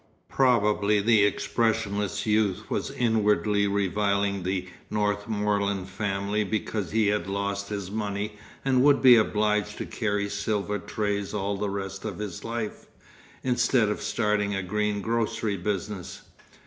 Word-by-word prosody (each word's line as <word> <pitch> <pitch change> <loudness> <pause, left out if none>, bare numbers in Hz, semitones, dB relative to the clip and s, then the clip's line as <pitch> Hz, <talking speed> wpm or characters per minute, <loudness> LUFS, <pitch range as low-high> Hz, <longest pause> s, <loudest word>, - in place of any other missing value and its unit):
Probably 105 -5 +3
the 110 0 +4
expressionless 105 -2 0
youth 105 -3 +1
was - - -1
inwardly 105 -3 +2
reviling 100 0 0
the 90 0 -2 0.2
Northmorland 105 -2 0
family 100 +1 -1
because 105 -2 -2
he 110 +2 +2
had 105 -1 0
lost 100 0 -2
his 100 -3 -4
money 105 0 -3 0.3
and 130 -1 +3
would 140 -1 +4
be 125 -2 +10
obliged 105 -1 +1
to - - -4
carry 105 -3 -1
silver 105 0 -2
trays 105 -1 -2
all 100 0 -1
the 100 +1 -2
rest 95 0 -5
of 100 -5 -4
his 105 -5 -6
life, 115 -2 -4 0.6
instead 125 -3 +2
of 105 - -2
starting 105 -2 0
a 95 - -2
green 105 +2 -1
grocery 115 -2 0
business. 100 0 -4
105 Hz, 135 wpm, -26 LUFS, 100-110 Hz, 0.6 s, be